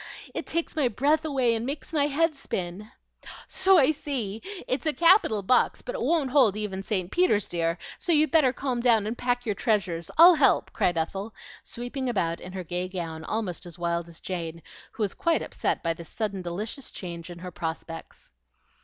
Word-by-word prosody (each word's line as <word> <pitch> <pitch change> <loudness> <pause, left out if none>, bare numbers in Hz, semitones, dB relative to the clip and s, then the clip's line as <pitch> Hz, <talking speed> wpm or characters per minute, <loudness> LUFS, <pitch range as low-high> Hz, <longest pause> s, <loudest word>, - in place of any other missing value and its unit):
It - - -4
takes 335 -1 -1
my 295 -5 +2
breath 290 +7 +1
away 260 -6 +2
and 225 0 -1
makes 280 +5 -5
my 290 -2 +3
head 310 +2 +1
spin." 195 -5 -5 0.6
"So 380 0 +4
I 290 -2 +5
see. 245 -9 -3 0.3
It's 265 +5 -1
a 310 - +2
capital 335 - +4
box, 250 +6 +2
but - - -5
it - - -4
won't 305 -6 +1
hold 245 -8 +4
even 200 -3 -3
St. 195 -3 -2
Peter's, 285 - +2
dear; 165 0 -1 0.2
so 355 - -1
you'd 310 -1 +4
better 305 -6 +5
calm 255 -1 -2
down 230 -4 +4
and 220 +3 -2
pack 245 0 -1
your 215 - 0
treasures. 185 -7 -1
I'll 345 +3 +10
help," 320 - +3
cried 175 -2 +1
Ethel, 195 +6 -3 0.3
sweeping 245 +2 -5
about 170 -7 -1
in 180 - -9
her 185 -1 -4
gay 180 +2 -3
gown, 165 -4 -5
almost 210 -6 -3
as 170 - -10
wild 170 -1 -2
as 165 - -13
Jane, 170 -3 -5 0.3
who 220 - -2
was 200 - -1
quite 335 -1 +1
upset - - -2
by 165 -1 +1
this 165 0 -10
sudden 205 -4 -3
delicious 205 +9 -4
change 170 -2 -7
in 175 - -8
her 180 +1 -8
prospects. 165 0 -6
215 Hz, 195 wpm, -26 LUFS, 175-280 Hz, 0.6 s, I'll